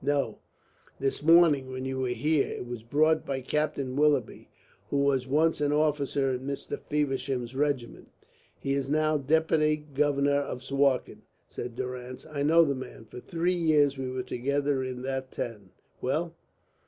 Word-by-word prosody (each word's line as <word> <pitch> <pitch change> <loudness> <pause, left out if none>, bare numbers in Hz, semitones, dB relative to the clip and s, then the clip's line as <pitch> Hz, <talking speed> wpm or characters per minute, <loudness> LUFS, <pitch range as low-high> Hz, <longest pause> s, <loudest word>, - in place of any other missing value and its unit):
"No, 145 -1 0 0.6
this 135 - -1
morning 155 -4 +5
when 130 0 -5
you 130 0 -3
were 130 - 0
here. 140 +5 +1
It - - -5
was 120 -2 -6
brought 155 +7 +2
by 140 - -3
a - - -5
Captain 140 -2 -1
Willoughby, 150 0 +1 0.4
who 140 0 +1
was 135 -2 +1
once 155 +3 +2
an 145 0 +2
officer 145 -3 +1
in 125 - -2
Mr. 140 0 -4
Feversham's 135 -4 -1
regiment." 135 -4 -2 0.5
"He 135 - -2
is 140 -1 -1
now 155 0 +2
Deputy 155 +1 +2
Governor 145 -1 +1
of 130 -3 -5
Suakin," 135 -1 +1 0.3
said 120 -1 -6
Durrance. 125 0 -6
"I 150 -2 -5
know 165 +3 +5
the 140 - 0
man. 130 -3 -8
For 125 - -10
three 170 +7 -1
years 155 -5 +3
we 130 -1 -4
were 130 0 -3
together 140 +2 -1
in 130 -1 -5
that 130 0 -3
town. 105 -5 -6 0.3
Well?" 160 +6 -1
140 Hz, 165 wpm, -28 LUFS, 130-150 Hz, 0.6 s, morning